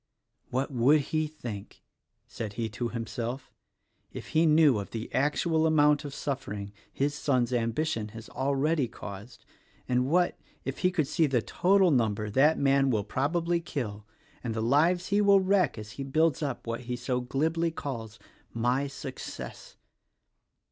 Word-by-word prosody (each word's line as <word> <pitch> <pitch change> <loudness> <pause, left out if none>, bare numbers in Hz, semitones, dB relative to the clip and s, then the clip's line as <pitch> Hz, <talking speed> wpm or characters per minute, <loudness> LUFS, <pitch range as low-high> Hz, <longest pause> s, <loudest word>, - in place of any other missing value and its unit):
"What 130 +3 -1
would 135 +4 +4
he 155 +2 -1
think," 120 -10 -8 0.4
said 110 -3 -6
he 115 +1 -2
to 120 +3 -3
himself, 120 +2 -5 0.6
"if - - -8
he 160 +1 +3
knew 150 -7 +5
of 100 - -6
the 115 0 -6
actual 160 +3 +2
amount 150 -1 +4
of 140 - -6
suffering 105 -9 -4 0.2
his 145 +1 0
son's 130 -4 0
ambition 115 0 0
has 115 +1 -10
already 140 +1 0
caused, 100 +3 -10 0.4
and 125 0 +1
what, 175 +2 +2 0.3
if 135 - -4
he 180 - +3
could 165 -5 0
see 160 0 +2
the 125 -5 +1
total 190 -1 +3
number 110 -5 +1
that 145 +8 +4
man 135 -1 +3
will 110 -5 +1
probably 165 - 0
kill 105 -10 -5 0.4
and 115 -3 -3
the 110 - -1
lives 165 +9 +3
he 205 +1 +3
will 200 -1 +6
wreck 190 -7 +2
as 105 -1 -8
he 135 - -6
builds 155 +3 +1
up 140 -4 -3
what 115 0 -3
he 125 - 0
so 125 +1 -2
glibly 160 +7 0
calls 115 -8 -6 0.4
'My 125 +4 +1
success.' 135 -1 -8
135 Hz, 155 wpm, -28 LUFS, 115-155 Hz, 0.6 s, will